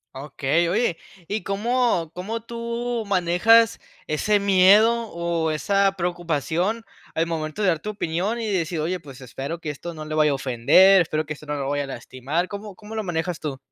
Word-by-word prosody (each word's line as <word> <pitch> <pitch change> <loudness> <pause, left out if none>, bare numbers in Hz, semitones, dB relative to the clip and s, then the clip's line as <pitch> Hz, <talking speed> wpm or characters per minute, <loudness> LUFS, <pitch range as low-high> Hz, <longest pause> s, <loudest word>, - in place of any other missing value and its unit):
Okey, 145 +4 0
oye, 195 -2 +1 0.3
¿y 210 -1 -3
cómo 210 -4 0
cómo 215 +6 -4
tú 235 0 -4
manejas 200 +5 +4 0.3
ese 205 +7 +1
miedo, 205 +4 +5
o 170 -2 -1
esa 195 +6 +2
preocupación 175 - -1 0.3
al 165 +1 0
momento 160 +3 -4
de 200 - +2
dar 165 -4 +2
tu 210 - -6
opinión?, 200 +4 -2
y 225 - -3
decir: 175 -5 -1
"Oye, 175 +4 -1
pues, 140 -2 -12
espero 135 +6 -6
que 160 - -5
esto 160 +4 -6
no 155 -1 -8
le 155 0 -4
vaya 155 -1 +4
a - - +1
ofender, 135 +10 +5
espero 155 -2 -1
que 150 - -4
esto 150 - -13
no 150 0 -3
lo 140 -1 -3
vaya 145 0 0
a 140 - -7
lastimar", 140 +7 -3
¿cómo 205 0 -8
cómo 215 +3 -10
lo 220 - -2
manejas 175 -2 -2
tú? 140 -4 -5
175 Hz, 190 wpm, -23 LUFS, 155-210 Hz, 0.3 s, miedo